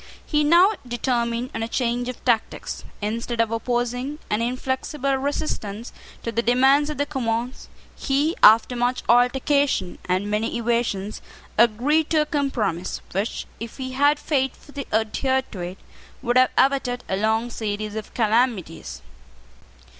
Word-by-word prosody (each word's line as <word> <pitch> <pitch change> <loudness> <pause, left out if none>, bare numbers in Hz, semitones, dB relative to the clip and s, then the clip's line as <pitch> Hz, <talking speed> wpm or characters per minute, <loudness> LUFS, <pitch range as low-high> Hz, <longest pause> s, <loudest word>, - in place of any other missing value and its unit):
He 300 -1 +1
now 345 +7 +6 0.2
determined 240 0 -1
on 225 - -3
a 225 - -1
change 245 +1 -1
of 250 - -8
tactics. 235 -3 -1 0.2
Instead 230 +2 -3
of 230 -1 +2
opposing 245 +4 -2
an 210 +2 +1
inflexible 260 +3 -1
resistance 265 -6 -3 0.3
to 230 - -2
the 230 - 0
demands 265 +5 +4
of 300 - -4
the 285 - +1
Commons, 245 -3 -3 0.3
he, 285 +5 0
after 225 +3 +7
much 245 +1 0
altercation 255 -3 +2
and 185 +3 0
many 215 +3 -1
evasions, 230 -4 -1 0.3
agreed 255 +8 +3
to 315 -1 +3
a - - +1
compromise 235 - -1
which, 200 +4 -2
if 230 0 -7
he 260 -1 -5
had 285 +3 +3
faithfully 280 0 -3
adhered 260 +5 0
to 195 - -8
it, 175 +2 -5 0.5
would 240 -1 0
have 255 0 +6
averted 265 -2 +2
a 190 - -1
long 220 +4 0
series 210 -1 -3
of 220 -1 -6
calamities. 210 - 0
240 Hz, 140 wpm, -23 LUFS, 220-270 Hz, 0.5 s, after